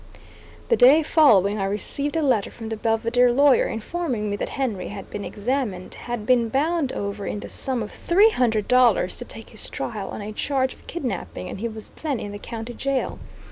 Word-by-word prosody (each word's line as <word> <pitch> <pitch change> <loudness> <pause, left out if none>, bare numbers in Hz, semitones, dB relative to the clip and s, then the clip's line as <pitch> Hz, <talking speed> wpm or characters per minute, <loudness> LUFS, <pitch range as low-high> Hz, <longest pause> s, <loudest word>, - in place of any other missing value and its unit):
The 470 - +5
day 295 - +7
following 215 - +4
I 195 - 0
received 280 +9 -2
a 325 - +1
letter 245 -8 +2
from 225 -2 -8
the 225 - -2
Belvidere 230 +3 +2
lawyer 280 +1 +5
informing 225 -3 -3
me - - 0
that - - -3
Henry 235 -9 -2
had 200 -1 -8
been 205 - -5
examined, 210 -4 -3
had 240 -3 -5
been 240 -2 +3
bound 295 +2 +1
over 200 0 -4
in 205 - -3
the - - -8
sum 255 -4 -2
of 210 - -8
three 405 +6 +4
hundred 225 - +1
dollars 250 -1 +4
to - - -7
take - - -10
his - - -8
trial - - -4
on 210 - -6
a 215 +1 -6
charge 260 +2 0
of - - -21
kidnapping, 205 - -4
and - - -6
he 230 - -1
was 220 -1 -8
then 290 -6 -3
in 205 - -5
the 205 - -7
county 230 +2 -6
jail. 275 +1 -2
235 Hz, 205 wpm, -24 LUFS, 210-275 Hz, -, day